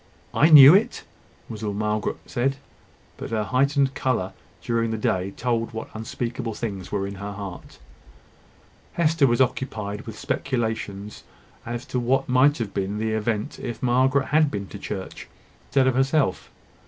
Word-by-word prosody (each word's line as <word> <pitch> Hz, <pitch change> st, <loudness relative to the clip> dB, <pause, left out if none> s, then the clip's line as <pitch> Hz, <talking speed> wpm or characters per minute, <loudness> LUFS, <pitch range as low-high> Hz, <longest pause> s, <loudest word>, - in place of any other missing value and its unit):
"I 155 Hz, -, +4 dB
knew 145 Hz, -1 st, +11 dB
it?" 225 Hz, +5 st, +2 dB, 0.4 s
was 110 Hz, -2 st, -8 dB
all 105 Hz, -1 st, -2 dB
that -, -, -5 dB
Margaret 105 Hz, 0 st, -1 dB
said; 135 Hz, +3 st, -1 dB, 0.6 s
but -, -, -6 dB
her 110 Hz, -2 st, -1 dB
heightened 135 Hz, +4 st, +1 dB
colour 115 Hz, -9 st, -1 dB, 0.3 s
during 115 Hz, -1 st, 0 dB
the 110 Hz, -, -2 dB
day 95 Hz, -3 st, 0 dB
told 115 Hz, +2 st, -2 dB
what 110 Hz, -, -6 dB
unspeakable 115 Hz, +1 st, -4 dB
things 100 Hz, -5 st, -5 dB
were 100 Hz, -1 st, -1 dB
in 100 Hz, -, -5 dB
her 100 Hz, 0 st, -5 dB
heart. 100 Hz, -2 st, -8 dB, 1.2 s
Hester 160 Hz, -3 st, +3 dB
was 120 Hz, +1 st, +2 dB
occupied 110 Hz, -6 st, -2 dB
with 110 Hz, -1 st, -7 dB
speculations 110 Hz, -6 st, -3 dB, 0.4 s
as 120 Hz, 0 st, -4 dB
to 125 Hz, -, -2 dB
what 130 Hz, +3 st, +1 dB
might 130 Hz, +4 st, +4 dB
have 115 Hz, -5 st, -4 dB
been 100 Hz, +1 st, -2 dB
the 110 Hz, +1 st, -1 dB
event 110 Hz, -1 st, -2 dB
if 120 Hz, 0 st, -6 dB
Margaret 130 Hz, +2 st, +2 dB
had 155 Hz, 0 st, +4 dB
been 100 Hz, -5 st, -4 dB
to 100 Hz, -, -9 dB
church 95 Hz, -2 st, -6 dB, 0.4 s
instead 135 Hz, -2 st, +2 dB
of 130 Hz, -, +3 dB
herself. 135 Hz, -3 st, +1 dB
115 Hz, 160 wpm, -24 LUFS, 105-130 Hz, 1.2 s, knew